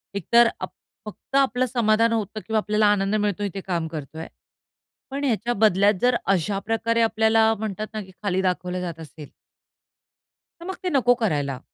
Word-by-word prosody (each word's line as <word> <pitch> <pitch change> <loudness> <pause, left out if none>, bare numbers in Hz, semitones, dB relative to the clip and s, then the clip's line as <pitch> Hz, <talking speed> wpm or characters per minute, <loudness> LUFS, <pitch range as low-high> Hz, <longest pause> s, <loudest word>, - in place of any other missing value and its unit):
एकतर 235 +5 +4
आप - - -5 0.3
फक्त 215 +5 -9
आपलं 260 -2 +2
समाधान 230 -2 +2
होतं 215 -1 -3
किंवा 220 0 0
आपल्याला 210 0 +2
आनंद 200 0 +1
मिळतो 205 -1 -1
इथे 195 -1 -4
काम 170 -4 -2
करतोय. 160 0 -7 0.8
पण 280 +1 -4
ह्याच्या 240 -1 0
बदल्यात 205 -2 +4
जर 250 0 +3
अशा 195 +1 0
प्रकारे 225 +2 0
आपल्याला 220 0 +3
म्हणतात 215 0 -4
ना, 215 - -4
की 190 - -15
खाली 190 -2 0
दाखवलं 180 -1 -2
जात 170 -2 -5
असेल 155 -1 -11 1.3
तर 340 - -10
मग 380 - -4
ते 365 - 0
नको 245 -2 +4
करायला. 145 -8 -1
210 Hz, 165 wpm, -23 LUFS, 185-230 Hz, 1.3 s, एकतर